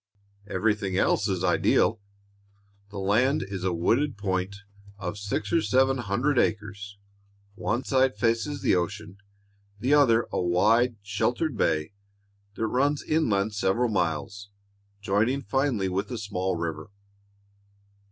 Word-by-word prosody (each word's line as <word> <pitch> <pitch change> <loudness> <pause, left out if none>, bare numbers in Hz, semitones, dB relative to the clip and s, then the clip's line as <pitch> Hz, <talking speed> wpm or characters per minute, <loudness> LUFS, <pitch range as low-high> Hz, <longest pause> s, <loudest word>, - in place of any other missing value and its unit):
Everything 100 -1 0
else - - +2
is 95 -2 -2
ideal. 90 +3 +2 0.9
The 105 - -9
land 115 +9 +2
is 95 -2 -5
a 95 - +1
wooded 105 - +1
point 95 -1 -2 0.4
of 105 0 -5
six 100 +9 -3
or 165 - +4
seven 135 -1 +2
hundred 120 +6 0
acres. 100 -2 -2 0.6
One 115 +5 -2
side 130 0 +2
faces 115 +5 0
the - - +3
ocean, 100 +2 -4 0.6
the 130 +6 +1
other 120 -6 +4
a - - -1
wide, 110 +8 +3
sheltered 120 +8 -1
bay 80 -5 0 0.6
that 110 - -1
runs 140 +6 +1
inland 110 -10 +1
several 105 +4 +1
miles, 95 +1 -2 0.5
joining 110 +8 +1
finally 135 -8 0
with 95 +2 -2
a 125 - -4
small 95 -3 -2
river. 85 +1 -4
105 Hz, 125 wpm, -26 LUFS, 95-125 Hz, 0.9 s, or